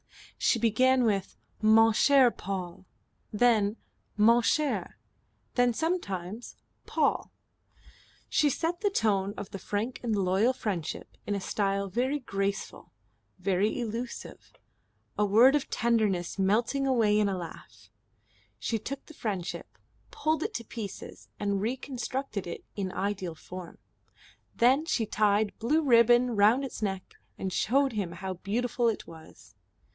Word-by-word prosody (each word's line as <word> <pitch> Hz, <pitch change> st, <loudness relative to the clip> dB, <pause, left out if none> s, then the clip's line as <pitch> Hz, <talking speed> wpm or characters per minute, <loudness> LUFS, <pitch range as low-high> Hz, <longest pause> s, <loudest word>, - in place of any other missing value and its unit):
She -, -, +3 dB
began 250 Hz, +3 st, +3 dB
with 200 Hz, -4 st, -1 dB, 0.2 s
"Mon 225 Hz, +1 st, +6 dB
cher 265 Hz, +1 st, +5 dB
Paul." 185 Hz, -2 st, -6 dB, 0.4 s
Then 215 Hz, -1 st, +3 dB, 0.4 s
"Mon 230 Hz, +3 st, +5 dB
cher," 300 Hz, +5 st, 0 dB, 0.6 s
then 245 Hz, -1 st, +3 dB
sometimes 220 Hz, -, -3 dB, 0.3 s
"Paul." -, -, 0 dB, 1.0 s
She 295 Hz, -, +3 dB
set 335 Hz, +6 st, -2 dB
the 410 Hz, -, +2 dB
tone 205 Hz, -, 0 dB
of 200 Hz, -, -7 dB
the 195 Hz, -, -6 dB
frank 215 Hz, +6 st, -3 dB
and 230 Hz, -3 st, -1 dB
loyal 195 Hz, +5 st, +2 dB
friendship 195 Hz, -10 st, -4 dB
in 205 Hz, -, 0 dB
a -, -, -1 dB
style 200 Hz, 0 st, -1 dB
very 250 Hz, +9 st, 0 dB
graceful, 200 Hz, -6 st, -4 dB, 0.5 s
very 190 Hz, +3 st, 0 dB
elusive, 235 Hz, +1 st, -6 dB, 0.7 s
a 210 Hz, -, +4 dB
word 235 Hz, +7 st, +6 dB
of 290 Hz, -, -1 dB
tenderness 215 Hz, -6 st, 0 dB
melting 230 Hz, +8 st, +1 dB
away 220 Hz, -5 st, +3 dB
in 205 Hz, -1 st, +2 dB
a 190 Hz, -, -2 dB
laugh; 110 Hz, -, -10 dB, 0.7 s
she 220 Hz, -, -2 dB
took 275 Hz, +6 st, -6 dB
the 315 Hz, -, -13 dB
friendship, 195 Hz, -, -5 dB, 0.3 s
pulled 310 Hz, 0 st, -1 dB
it -, -, -3 dB
to 235 Hz, -, -3 dB
pieces 215 Hz, -3 st, -8 dB
and 200 Hz, -1 st, -1 dB
reconstructed 255 Hz, -2 st, -3 dB
it 170 Hz, -, -7 dB
in 190 Hz, -2 st, -3 dB
ideal 190 Hz, -4 st, -3 dB
form; 180 Hz, +2 st, -10 dB, 0.8 s
then 260 Hz, +5 st, +4 dB
she 230 Hz, -, +1 dB
tied 210 Hz, 0 st, +1 dB
blue 300 Hz, +8 st, +2 dB
ribbon 240 Hz, -1 st, +5 dB
round 220 Hz, +7 st, +4 dB
its 255 Hz, -, -7 dB
neck, 190 Hz, -3 st, -3 dB, 0.2 s
and 190 Hz, -1 st, -4 dB
showed 270 Hz, +6 st, +2 dB
him 195 Hz, -5 st, -3 dB
how 190 Hz, +2 st, -5 dB
beautiful 235 Hz, +6 st, -1 dB
it 220 Hz, -, -4 dB
was. 160 Hz, -1 st, -14 dB
215 Hz, 135 wpm, -28 LUFS, 195-245 Hz, 1.0 s, Mon